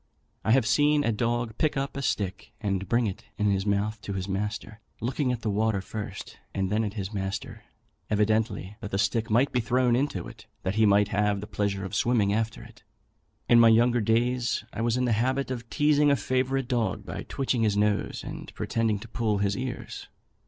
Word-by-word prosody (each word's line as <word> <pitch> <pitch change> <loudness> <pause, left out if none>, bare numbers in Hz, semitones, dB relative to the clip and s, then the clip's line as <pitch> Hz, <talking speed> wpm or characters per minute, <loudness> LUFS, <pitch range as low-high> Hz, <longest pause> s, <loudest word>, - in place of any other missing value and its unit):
I - - -2
have 130 -3 +4
seen 145 +5 +3
a 115 - +2
dog 115 0 -1
pick 155 -3 +1
up 135 0 -2
a 140 - -3
stick 100 -7 -2
and 100 -3 -2
bring 120 0 +3
it 95 -3 -4
in 105 -1 +2
his 95 +1 0
mouth 105 +2 0
to 100 - -5
his 95 -1 -3
master, 105 +2 -3 0.2
looking 130 +3 0
at 120 -2 -3
the 110 - 0
water 110 0 +1
first 100 0 -7 0.2
and 95 0 -1
then 110 +1 +2
at 105 0 -3
his 100 0 -4
master, 95 0 -4 0.4
evidently 105 -1 0
that 100 - -6
the 95 - -1
stick 110 +3 0
might 120 +6 +3
be 125 - +1
thrown 120 +1 +2
into 125 -9 -1
it, - - -13 0.2
that 95 - -1
he 110 0 +4
might 100 0 +4
have 105 0 +1
the 105 - -6
pleasure 100 -2 -2
of 95 - -7
swimming 105 -2 +2
after 110 +1 -2
it. - - -15 0.7
In 120 - +6
my 115 -1 +8
younger 120 +1 +4
days, 120 +3 +1
I 105 - -3
was 120 +1 +1
in 125 - +1
the 120 - +1
habit 130 +5 0
of 120 -2 -5
teazing 150 -1 +3
a 140 - +5
favourite 130 +2 0
dog 120 -5 -1
by - - -5
twitching 130 -3 -1
his 105 -2 +2
nose 105 0 0
and - - -7
pretending 115 -2 0
to 120 - -9
pull 110 -2 0
his 100 0 +1
ears. 130 -1 -5
110 Hz, 210 wpm, -27 LUFS, 100-125 Hz, 0.7 s, my